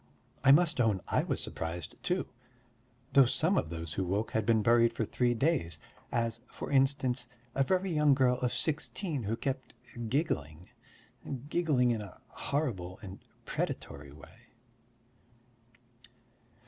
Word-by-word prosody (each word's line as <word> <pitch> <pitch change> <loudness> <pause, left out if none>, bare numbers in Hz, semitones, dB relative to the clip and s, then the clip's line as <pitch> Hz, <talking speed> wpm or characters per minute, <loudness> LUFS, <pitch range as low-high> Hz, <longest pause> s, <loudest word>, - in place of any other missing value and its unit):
I 135 - +7
must 155 -2 +5
own 110 -5 +2
I - - +3
was - - -2
surprised 80 0 -5
too; 180 +1 0 0.9
though 135 -2 +7
some 165 +8 +1
of 80 - 0
those 80 -1 -5
who 95 - -1
woke 100 +5 -1
had 110 -1 -1
been 110 -2 +4
buried 115 0 +4
for 115 - -1
three 120 +2 +1
days, 120 - +1 0.3
as, 115 0 -1
for - - -7
instance, 135 -2 +2 0.3
a 135 - +1
very 185 +5 +1
young 150 -3 +4
girl 125 -2 +3
of 125 -1 0
sixteen 160 0 -2
who 110 +3 0
kept 130 +1 -4 0.3
giggling... 85 - -1 0.8
giggling 150 -8 +2
in 115 -2 -1
a 100 -3 -10
horrible 105 - -2
and 95 -1 -8 0.3
predatory 70 0 -4
way. 70 0 -16
120 Hz, 135 wpm, -31 LUFS, 100-140 Hz, 0.9 s, I